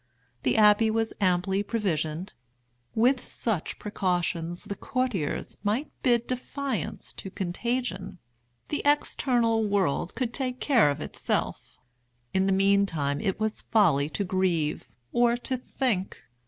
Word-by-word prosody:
The 125 Hz, -, +1 dB
abbey 210 Hz, +1 st, +6 dB
was 225 Hz, 0 st, 0 dB
amply 190 Hz, +1 st, +2 dB
provisioned. 185 Hz, -5 st, -2 dB, 0.6 s
With 245 Hz, +3 st, +3 dB
such 215 Hz, -9 st, -2 dB
precautions 175 Hz, -4 st, -1 dB
the -, -, -4 dB
courtiers 255 Hz, -, -2 dB
might 220 Hz, +8 st, -1 dB
bid 240 Hz, -2 st, +3 dB
defiance 255 Hz, -, -4 dB
to 195 Hz, -, -7 dB
contagion. 195 Hz, +1 st, -3 dB, 0.5 s
The 295 Hz, -, -1 dB
external 245 Hz, -6 st, +2 dB
world 190 Hz, -5 st, 0 dB
could 240 Hz, -1 st, -2 dB
take 255 Hz, -2 st, -2 dB
care 240 Hz, -, +4 dB
of 145 Hz, +1 st, -2 dB
itself. -, -, -3 dB, 0.6 s
In 190 Hz, 0 st, +2 dB
the -, -, +2 dB
meantime 190 Hz, -7 st, +2 dB
it 190 Hz, -, -1 dB
was 220 Hz, 0 st, -1 dB
folly 155 Hz, -10 st, +3 dB
to 200 Hz, -, -2 dB
grieve, 180 Hz, -7 st, 0 dB, 0.2 s
or 240 Hz, 0 st, +3 dB
to 260 Hz, +2 st, -2 dB
think. 245 Hz, -6 st, -2 dB
205 Hz, 125 wpm, -27 LUFS, 180-240 Hz, 0.6 s, abbey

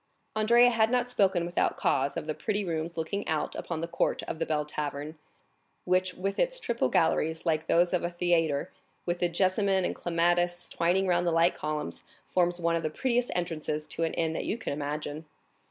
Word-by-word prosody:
Andrea 235 Hz, +3 st, +5 dB
had 225 Hz, -1 st, +3 dB
not 250 Hz, 0 st, +1 dB
spoken 190 Hz, -7 st, +2 dB
without 175 Hz, +1 st, 0 dB
cause 135 Hz, +4 st, +1 dB
of 160 Hz, -, -3 dB
the 155 Hz, -, -2 dB
pretty 205 Hz, +4 st, -2 dB
rooms 165 Hz, 0 st, -3 dB
looking 200 Hz, +6 st, -3 dB
out 155 Hz, -1 st, -1 dB
upon 165 Hz, -2 st, -4 dB
the 165 Hz, -, -2 dB
court 170 Hz, 0 st, 0 dB
of 160 Hz, -, -5 dB
the -, -, -1 dB
Bell 155 Hz, -1 st, +1 dB
Hotel, 150 Hz, 0 st, -4 dB, 0.7 s
which 185 Hz, 0 st, +1 dB
with 195 Hz, +2 st, -3 dB
its -, -, +2 dB
triple 235 Hz, -, 0 dB
galleries 160 Hz, +2 st, +1 dB
like 160 Hz, -1 st, 0 dB
those 175 Hz, +2 st, +3 dB
of 180 Hz, -, +1 dB
a 175 Hz, -, 0 dB
theatre, 170 Hz, -4 st, +1 dB, 0.3 s
with 175 Hz, 0 st, -1 dB
the 175 Hz, -, +2 dB
jessamine 190 Hz, +2 st, +2 dB
and -, -, -1 dB
clematis 175 Hz, +1 st, +1 dB
twining 180 Hz, +3 st, +1 dB
round 175 Hz, -1 st, +2 dB
the -, -, +3 dB
light 165 Hz, +1 st, +4 dB
columns, 150 Hz, -, -4 dB, 0.2 s
forms 175 Hz, -1 st, +1 dB
one 170 Hz, 0 st, +1 dB
of 165 Hz, -, 0 dB
the 155 Hz, -, -1 dB
prettiest 245 Hz, +8 st, 0 dB
entrances 155 Hz, -3 st, -2 dB
to 165 Hz, -, -2 dB
an 165 Hz, -, -1 dB
inn 160 Hz, -1 st, 0 dB
that -, -, -3 dB
you 220 Hz, -, -1 dB
can 225 Hz, -, -4 dB
imagine. 150 Hz, +1 st, -4 dB
175 Hz, 200 wpm, -29 LUFS, 160-190 Hz, 0.7 s, Andrea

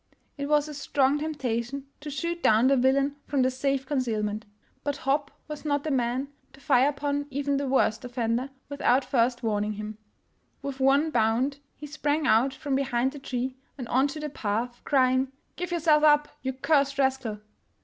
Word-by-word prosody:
It 280 Hz, -1 st, -4 dB
was 300 Hz, 0 st, +3 dB
a 300 Hz, -, -7 dB
strong 280 Hz, 0 st, +1 dB
temptation 275 Hz, -3 st, -3 dB
to 295 Hz, -, -7 dB
shoot 340 Hz, +5 st, -3 dB
down 220 Hz, +2 st, +4 dB
the 275 Hz, +1 st, +5 dB
villain 275 Hz, +2 st, +2 dB
from 275 Hz, -3 st, +2 dB
the 255 Hz, -, +2 dB
safe 270 Hz, +1 st, -1 dB
concealment. 220 Hz, -6 st, -1 dB, 0.4 s
But 285 Hz, -1 st, -2 dB
Hopp 280 Hz, +1 st, +1 dB, 0.2 s
was 300 Hz, -1 st, -7 dB
not 285 Hz, -2 st, 0 dB
the 310 Hz, -, -2 dB
man 255 Hz, +1 st, 0 dB, 0.2 s
to 270 Hz, -, -16 dB
fire 275 Hz, -1 st, +4 dB
upon 285 Hz, 0 st, -2 dB
even 280 Hz, +1 st, -1 dB
the 280 Hz, 0 st, -2 dB
worst 260 Hz, -3 st, +2 dB
offender 245 Hz, +1 st, -1 dB, 0.2 s
without 275 Hz, -2 st, +2 dB
first 240 Hz, -1 st, +1 dB
warning 210 Hz, -1 st, 0 dB
him. 215 Hz, +1 st, -7 dB, 0.6 s
With 275 Hz, -1 st, -5 dB
one 280 Hz, +4 st, +3 dB
bound 250 Hz, +4 st, +1 dB, 0.2 s
he 300 Hz, -, -9 dB
sprang 295 Hz, +1 st, -1 dB
out 230 Hz, +5 st, +4 dB
from 280 Hz, +1 st, -4 dB
behind 265 Hz, -1 st, +1 dB
the 290 Hz, -, -9 dB
tree 255 Hz, -1 st, -3 dB, 0.2 s
and 250 Hz, -4 st, -6 dB
on 265 Hz, +3 st, +3 dB
to 290 Hz, +2 st, -6 dB
the 300 Hz, 0 st, -4 dB
path, 235 Hz, +1 st, -3 dB
crying, 260 Hz, -1 st, +3 dB
" -, -, -44 dB
Give 360 Hz, 0 st, -4 dB
yourself 320 Hz, -3 st, +3 dB
up, 295 Hz, -1 st, +5 dB
you 265 Hz, -, -1 dB
cursed 275 Hz, +1 st, +2 dB
rascal! 265 Hz, -5 st, 0 dB
270 Hz, 180 wpm, -27 LUFS, 245-285 Hz, 0.6 s, the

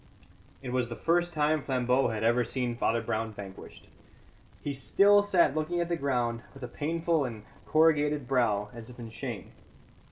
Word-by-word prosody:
It 125 Hz, -, -5 dB
was 125 Hz, -1 st, 0 dB
the 120 Hz, -, -5 dB
first 175 Hz, +4 st, +1 dB
time 155 Hz, -1 st, +1 dB
Flambeau 130 Hz, -1 st, +1 dB
had 110 Hz, -2 st, -3 dB
ever 120 Hz, +2 st, +3 dB
seen 125 Hz, -1 st, -2 dB
Father 115 Hz, -1 st, 0 dB
Brown 110 Hz, 0 st, -2 dB
vanquished. 100 Hz, -2 st, -11 dB, 0.8 s
He 145 Hz, -, -2 dB
still 200 Hz, +9 st, +4 dB
sat 185 Hz, -8 st, +3 dB
looking 155 Hz, +3 st, -1 dB
at 170 Hz, 0 st, -1 dB
the 170 Hz, -, +1 dB
ground, 125 Hz, -6 st, -1 dB
with 135 Hz, -, -11 dB
a -, -, -3 dB
painful 160 Hz, +3 st, 0 dB
and 115 Hz, -5 st, -6 dB, 0.2 s
corrugated 150 Hz, -3 st, +3 dB
brow, 110 Hz, -6 st, +1 dB
as 115 Hz, -1 st, -10 dB
if 125 Hz, -, -12 dB
in 115 Hz, -2 st, -8 dB
shame. 115 Hz, -2 st, -6 dB
130 Hz, 170 wpm, -29 LUFS, 115-155 Hz, 0.8 s, still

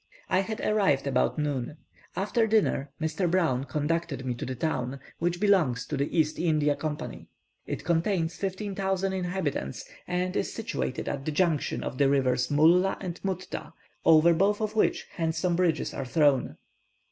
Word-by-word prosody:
I 185 Hz, -, +3 dB
had 215 Hz, +3 st, -3 dB
arrived 195 Hz, -11 st, +2 dB
about 135 Hz, +2 st, +1 dB
noon. 145 Hz, -1 st, -2 dB, 0.4 s
After 215 Hz, +4 st, +1 dB
dinner, 210 Hz, -10 st, +2 dB
Mr. 160 Hz, +3 st, 0 dB
Brown 160 Hz, -8 st, +1 dB
conducted 150 Hz, 0 st, -2 dB
me 125 Hz, -, -1 dB
to 120 Hz, -, -6 dB
the 130 Hz, -, -3 dB
town, 130 Hz, -1 st, -2 dB, 0.2 s
which 175 Hz, +1 st, 0 dB
belongs 165 Hz, -, +2 dB
to 150 Hz, -, -3 dB
the 140 Hz, +1 st, -1 dB
East 155 Hz, -1 st, +1 dB
India 155 Hz, -3 st, +2 dB
Company. 150 Hz, 0 st, -5 dB, 0.4 s
It -, -, -4 dB
contains 170 Hz, 0 st, +1 dB
15,000 195 Hz, -1 st, -2 dB
inhabitants, 180 Hz, -, -3 dB, 0.2 s
and 180 Hz, +1 st, -1 dB
is -, -, -1 dB
situated 225 Hz, -, -3 dB
at 140 Hz, -1 st, -3 dB
the 155 Hz, -, -1 dB
junction 160 Hz, -2 st, 0 dB
of 130 Hz, -, -5 dB
the 140 Hz, -1 st, +4 dB
rivers 125 Hz, -2 st, +2 dB
Mulla 170 Hz, +6 st, +4 dB
and 180 Hz, -3 st, -5 dB
Mutta, 185 Hz, -1 st, -4 dB, 0.3 s
over 165 Hz, +1 st, +6 dB
both 200 Hz, +5 st, +2 dB
of 215 Hz, 0 st, -2 dB
which 215 Hz, -, +2 dB
handsome 165 Hz, +1 st, 0 dB
bridges 170 Hz, -3 st, +1 dB
are -, -, -4 dB
thrown. 145 Hz, -1 st, +2 dB
165 Hz, 160 wpm, -28 LUFS, 145-185 Hz, 0.4 s, over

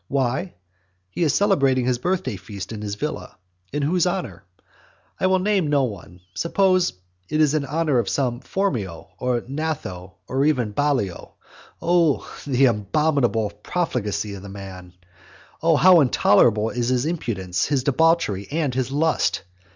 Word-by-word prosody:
Why? 135 Hz, +7 st, -1 dB, 0.6 s
He -, -, -5 dB
is 155 Hz, -5 st, +2 dB
celebrating 135 Hz, -, +3 dB
the 125 Hz, -1 st, 0 dB
birthday 170 Hz, -, -1 dB
feast 100 Hz, +2 st, -8 dB
at 105 Hz, -, -6 dB
his 105 Hz, -1 st, -4 dB
villa. 150 Hz, -4 st, -5 dB, 0.3 s
In 145 Hz, 0 st, -2 dB
whose 175 Hz, +5 st, +2 dB
honour? 130 Hz, -, -4 dB, 0.7 s
I 185 Hz, -, +2 dB
will 185 Hz, 0 st, +3 dB
name 190 Hz, -3 st, +1 dB
no 145 Hz, -2 st, +2 dB
one. 95 Hz, -6 st, -6 dB
Suppose 185 Hz, -, +2 dB, 0.4 s
it 155 Hz, -, 0 dB
is 155 Hz, -2 st, +4 dB
in 155 Hz, -2 st, 0 dB
honour 150 Hz, -2 st, +1 dB
of 115 Hz, -, -1 dB
some 125 Hz, -4 st, -1 dB
Phormio, 120 Hz, -, -3 dB
or 125 Hz, -1 st, 0 dB
Gnatho, 135 Hz, -, -4 dB
or 135 Hz, +1 st, 0 dB
even 125 Hz, -8 st, +1 dB
Ballio. 130 Hz, -9 st, -1 dB, 0.5 s
Oh 170 Hz, -4 st, +2 dB, 0.2 s
the 135 Hz, -1 st, +3 dB
abominable 120 Hz, 0 st, +1 dB
profligacy 110 Hz, -, -2 dB
of 100 Hz, -, -8 dB
the 100 Hz, -, -9 dB
man! 95 Hz, -2 st, -9 dB, 0.7 s
Oh 165 Hz, 0 st, +4 dB
how 180 Hz, +3 st, +7 dB
intolerable 110 Hz, -4 st, +3 dB
is 120 Hz, -1 st, -1 dB
his 130 Hz, +1 st, +1 dB
impudence, 105 Hz, -, -2 dB
his 140 Hz, -3 st, 0 dB
debauchery, 140 Hz, -, +2 dB
and 150 Hz, -4 st, 0 dB
his 130 Hz, 0 st, -2 dB
lust! 155 Hz, -6 st, +1 dB
130 Hz, 150 wpm, -23 LUFS, 105-160 Hz, 0.7 s, how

